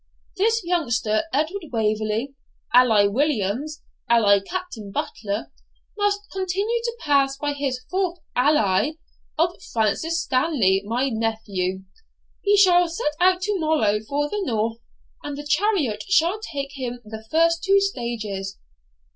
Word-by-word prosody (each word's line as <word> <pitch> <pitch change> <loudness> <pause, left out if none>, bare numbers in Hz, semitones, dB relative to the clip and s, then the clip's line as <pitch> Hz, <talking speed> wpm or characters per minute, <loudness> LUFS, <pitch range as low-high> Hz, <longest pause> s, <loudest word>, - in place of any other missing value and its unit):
This 445 +2 +2
youngster, 240 -10 0
Edward 320 +6 -1
Waverley, 215 +3 -1 0.4
alias 220 -5 +5
Williams, 275 +3 -1 0.3
alias 200 -4 +4
Captain 355 - -5
Butler, 205 +1 -4 0.4
must 410 -1 +1
continue 390 +5 -1
to 470 0 -3
pass 275 -2 +2
by 290 0 -2
his 270 -3 -3
fourth 370 -2 0 0.2
ALIAS 250 -1 +2 0.4
of 345 +3 0
Francis 320 +10 0
Stanley, 255 - +2
my 250 +5 0
nephew; 215 -5 -2 0.6
he 410 0 +3
shall 355 -3 +6
set 325 -3 -2
out 365 +1 +3
to 410 0 0
morrow 300 -11 +2
for 285 +7 -2
the 415 +7 -3
North, 225 - -1 0.4
and 290 -1 -6
the 290 - -7
chariot 300 - +1
shall 365 +2 +3
take 280 -9 -5
him 250 -3 -5
the 220 +1 -8
first 335 +3 +2
two 395 0 +5
stages. 220 - -3
280 Hz, 130 wpm, -23 LUFS, 220-350 Hz, 0.6 s, shall